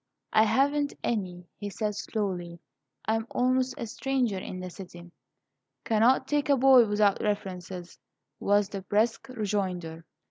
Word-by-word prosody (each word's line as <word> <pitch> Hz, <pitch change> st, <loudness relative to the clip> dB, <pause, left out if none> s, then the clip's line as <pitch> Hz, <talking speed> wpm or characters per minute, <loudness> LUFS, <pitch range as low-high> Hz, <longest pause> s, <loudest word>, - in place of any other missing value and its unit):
"I 220 Hz, -, +6 dB
haven't 285 Hz, +4 st, +1 dB
any," 180 Hz, -6 st, -2 dB
he 205 Hz, -, -4 dB
said, 210 Hz, +1 st, -2 dB
slowly. 185 Hz, -5 st, -3 dB, 0.5 s
"I 220 Hz, -, +1 dB
am 225 Hz, +1 st, -3 dB
almost 255 Hz, +1 st, +1 dB
a -, -, -4 dB
stranger 245 Hz, -3 st, -1 dB
in 185 Hz, 0 st, -6 dB
the 185 Hz, 0 st, -6 dB
city." 175 Hz, -2 st, -11 dB, 0.7 s
"Cannot 235 Hz, +4 st, +3 dB
take 290 Hz, -1 st, 0 dB
a 280 Hz, -, +5 dB
boy 260 Hz, -2 st, +7 dB
without 205 Hz, -1 st, +2 dB
references," 185 Hz, -3 st, -4 dB, 0.4 s
was 205 Hz, 0 st, +2 dB
the 195 Hz, -, -5 dB
brusque 215 Hz, +6 st, 0 dB
rejoinder. 185 Hz, -8 st, -3 dB
210 Hz, 140 wpm, -28 LUFS, 185-245 Hz, 0.7 s, boy